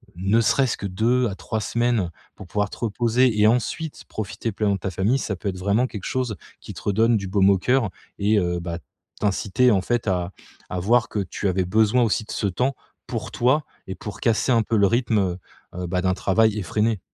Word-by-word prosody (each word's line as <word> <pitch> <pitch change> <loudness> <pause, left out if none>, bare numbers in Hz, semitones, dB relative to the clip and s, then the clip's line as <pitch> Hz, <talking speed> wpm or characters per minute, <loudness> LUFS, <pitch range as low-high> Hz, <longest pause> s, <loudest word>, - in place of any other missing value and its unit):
ne 95 +6 +2
serait-ce 130 +2 +2
que - - -7
2 120 +6 +1
à 95 - -5
3 110 +4 -4
semaines 115 -3 0 0.2
pour 100 - -10
pouvoir 105 +2 -1
te - - -10
reposer 120 +1 +1
et 105 - +6
ensuite 125 +7 -1
profiter 110 +2 -4
pleinement 100 0 0
de - - -6
ta 95 - -3
famille, 100 +9 +1
ça 100 -7 -3
peut 100 - -6
être 95 - -5
vraiment 100 +7 +1
quelque 105 -6 -8
chose 125 -5 -1 0.2
qui - - -9
te - - -10
redonne 110 +3 +2
du 100 -2 -4
baume 95 0 +4
au 100 - +5
cœur 125 +2 +2 0.3
et 105 +1 +3
heu, 90 -2 -1
bah, 85 0 -5 0.4
t'inciter, 105 +4 +2
en 100 -3 +3
fait, 120 +4 -1
à 90 -2 0 0.4
à 90 - -3
voir 120 +6 +3
que 105 - -2
tu 100 +1 -3
avais 95 0 +1
besoin 110 +5 +3
aussi 110 -1 0
de - - -9
ce 105 - 0
temps, 125 +9 0 0.3
pour - - -4
toi 130 +6 +2 0.2
et 95 - -5
pour 105 - -8
casser 115 +2 +2
un 115 -1 +3
peu 115 - -1
le 100 -1 +5
rythme, 115 0 +1
heu 90 -2 0 0.4
heu, 90 -1 -4
bah, 90 +1 -1
d'un 95 0 +1
travail 110 +3 +2
effréné. 105 +3 0
105 Hz, 220 wpm, -23 LUFS, 95-120 Hz, 0.4 s, et